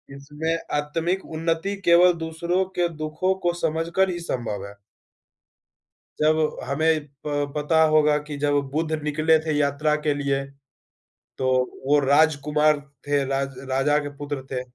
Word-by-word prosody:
इसमें 150 +4 -3 0.2
आत्मिक 165 +6 -2
उन्नति 165 +4 -1
केवल 175 +1 +7
दूसरों 170 +3 -1 0.2
के 175 - +3 0.2
दुखों 155 +5 0
को 175 - +3
समझकर 165 +4 +1
ही 175 - -3
संभव 115 -5 -3
है। 100 - -11 1.5
जब 155 0 +2
हमें 155 +2 +1 0.2
प 145 -1 -2
पता 155 +2 +2
होगा 150 -1 +4
कि 145 -1 -5
जब 145 0 0 0.2
बुद्ध 160 +1 -1
निकले 155 +2 +3
थे 155 - 0
यात्रा 150 +1 +1
के 150 - +3
लिए, 140 -1 -1 0.9
तो 130 - -1 0.4
वो 145 +2 +4
राजकुमार 150 +1 +3 0.3
थे, 145 -1 +2
राज 135 0 -2
राजा 135 +3 +2
के 145 -1 -5
पुत्र 145 -2 -5
थे, 125 -1 -2
150 Hz, 140 wpm, -24 LUFS, 145-160 Hz, 1.5 s, केवल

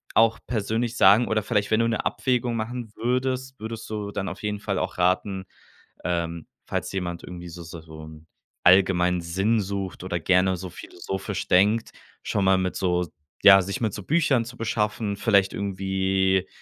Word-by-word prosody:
auch 115 0 +4
persönlich 115 +1 -1
sagen 105 +5 +6
oder 110 -1 0
vielleicht, 105 -1 0
wenn 110 +1 +4
du 115 - +2
'ne 115 - -2
Abwägung 125 -2 0
machen 115 0 -4
würdest, 130 +2 -2
würdest 110 +1 -6
du 105 -2 -4
dann 100 -1 -3
auf 95 - -9
jeden 105 -1 -2
Fall 100 -2 -2
auch - - -3
raten, 95 +2 +1 0.6
ähm, 85 -2 -2 0.2
falls - - -3
jemand 90 -3 -3
irgendwie 90 -1 -8
so 85 +1 -9
so 85 0 -9
so 80 -1 -11
'n 80 0 -13 0.4
allgemeinen 90 -1 +4
Sinn 95 +7 +1
sucht 95 -2 -4
oder 90 -2 -2
gerne 95 +2 +3
so 90 +1 -7
philosophisch 95 +3 -5
denkt, 105 +5 +3 0.3
schon 100 - 0
mal 95 0 +4
mit 95 -1 -1
so 90 -2 0 0.4
ja, 95 -1 +9
sich 95 +1 -4
mit 110 -4 -1
so 100 - -6
Büchern 145 - +2
zu 120 +1 -10
beschaffen, 105 -2 -1
vielleicht 100 -2 +3
irgendwie 95 -1 0
100 Hz, 175 wpm, -25 LUFS, 90-110 Hz, 0.6 s, ja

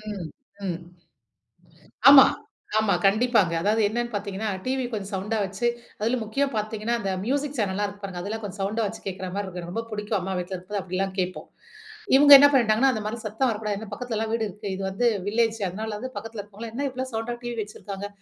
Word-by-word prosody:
ம் 175 -4 -5 0.4
ம். 175 -1 -2 1.3
ஆமா, 275 -1 +11 0.5
ஆமா. 215 -3 +3
கண்டிப்பாங்க. 210 -3 +3
அதாவது 215 +3 +2
என்னான்னு 240 +2 -2
பாத்தீங்கன்னா, 205 +1 -3 0.2
டிவி 260 0 -1
கொஞ்சம் 205 -1 -4
சவுண்ட்டா 210 +4 -1
வச்சு 195 +5 -2 0.3
அதிலும் 230 +2 0
முக்கிய 275 +7 0
பாத்தீங்கன்னா, 215 +2 -2
அந்த 195 -1 -2
மியூசிக் 285 +3 -1
சேனல்லாம் 205 0 0
இருக்கு 205 0 -10
பாருங்க. 185 -3 -5
அதெல்லாம் 220 +3 -4
கொஞ்சம் 200 0 -7
சவுண்ட்டா 215 +3 0
வைச்சு 220 +3 -6
கேக்கிறா 185 -1 -4
மாரி 205 0 -2
இருக்கும். 180 -1 -6
எனக்கு 175 +1 -7
ரொம்ப 230 +2 -3
புடிக்கும் 210 0 -2
அம்மா 190 +1 -4
வீட்ல 180 +1 -4
இருக்கும் 185 +3 -9
போது 200 - 0
அப்படிலாம் 190 +1 -2
கேப்போம். 185 0 -2 0.7
இவுங்க 285 +1 +7
என்னா 285 +1 +8
பண்ணிட்டாங்கன்னா, 240 +2 +4
அந்த 215 - -3
மாரி 230 +2 -3
சத்தம் 225 +5 0
வரக்கூடாது, 210 -1 -2
ஏன்னா 220 -1 -8
பக்கத்துலலாம் 225 -2 -3
வீடு 225 -1 0
இருக்கு. 205 +1 -7
இது 195 - -5
வந்து 235 +5 +2 0.2
வில்லேஜ்ஜு 225 +1 +1
அதனால 215 +4 -5
வந்து 255 +3 -5
பக்கத்தில 225 -1 -6
இருக்கிறவங்கலாம், 210 +3 -9
"என்ன 280 0 -1
இவ்ளோ 260 +1 -4
சவுண்டா 225 +2 -2
டிவி 240 -1 -4
வச்சிருக்காங்க?" 205 -1 -7
215 Hz, 195 wpm, -25 LUFS, 195-230 Hz, 1.3 s, ஆமா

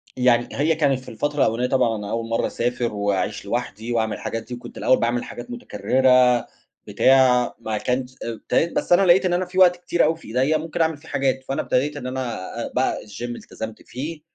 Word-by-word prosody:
يعني 125 -1 +3
هي 155 +3 +1
كانت 140 -4 +2
في 130 - -12
الفترة 145 +6 -3
الأولنية 120 0 +2
طبعًا 120 -4 +2
أنا 105 -1 -6
أول 115 0 -3
مَرّة 115 - 0
أسافر 120 -1 -2
واعيش 100 -2 -1
لوحدي 120 -1 -3
وأعمل 110 -2 0
الحاجات 115 -1 -4
دي، 125 - -9
وكنت 120 - -9
الأول 130 - +3
باعمل 120 +1 0
حاجات 245 - -9
متكرّرة 130 - +2 0.4
بتاع، 130 -2 +4
ما 110 -2 -3
كانش 125 +3 -2
إبتديت 115 +8 -1
بس - - -2
أنا 175 - +6
لقيت 185 +2 +5
إن 180 - +1
أنا 180 +1 +1
في 180 +1 -9
وقت 180 -1 +7
كتير 175 0 0
أوي 160 +2 +2
في - - -15
إيديّا 130 +7 +1
ممكن 160 +1 -4
أعمل 160 -2 +1
فيه 155 +3 -18
حاجات، 130 -1 0
فأنا 135 - -1
ابتديت 145 +3 0
إن 130 -3 -5
أنا 130 -4 -3 0.4
بقى - - +1
الGym 110 +4 -6
التزمت 110 0 -8
فيه، 150 +5 -6
125 Hz, 200 wpm, -22 LUFS, 115-150 Hz, 0.4 s, وقت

